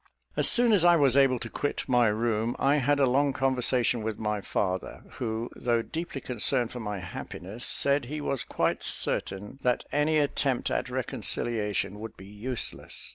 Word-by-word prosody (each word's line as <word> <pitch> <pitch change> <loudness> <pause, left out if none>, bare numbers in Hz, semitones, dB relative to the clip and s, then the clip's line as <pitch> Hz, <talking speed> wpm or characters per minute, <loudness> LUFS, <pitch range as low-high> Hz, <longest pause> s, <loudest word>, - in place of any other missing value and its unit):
As - - +6
soon 240 -2 +5
as 190 -5 +5
I 175 0 +6
was 140 -5 +4
able 135 -2 +4
to 120 - -5
quit 145 +5 -3
my 125 -2 +3
room, 110 +1 0
I 140 +2 +2
had 145 +1 +1
a 140 - +5
long 140 +2 +2
conversation 125 -3 +2
with 110 -1 -3
my 105 -1 -2
father, 95 -1 -3 0.2
who, 115 0 -3
though 120 -1 0
deeply 165 -2 -6
concerned 125 0 +2
for 125 - -7
my 105 -3 -4
happiness, 95 +4 -7
said 140 -1 +2
he 150 +5 -5
was 140 -5 -2
quite - - -1
certain 105 +7 -2
that 125 -1 0
any 150 +2 +2
attempt 140 -3 0
at - - -1
reconciliation 105 -3 -1
would 110 0 -8
be 95 - -12
useless. 110 +5 -5
125 Hz, 175 wpm, -27 LUFS, 110-140 Hz, 0.2 s, As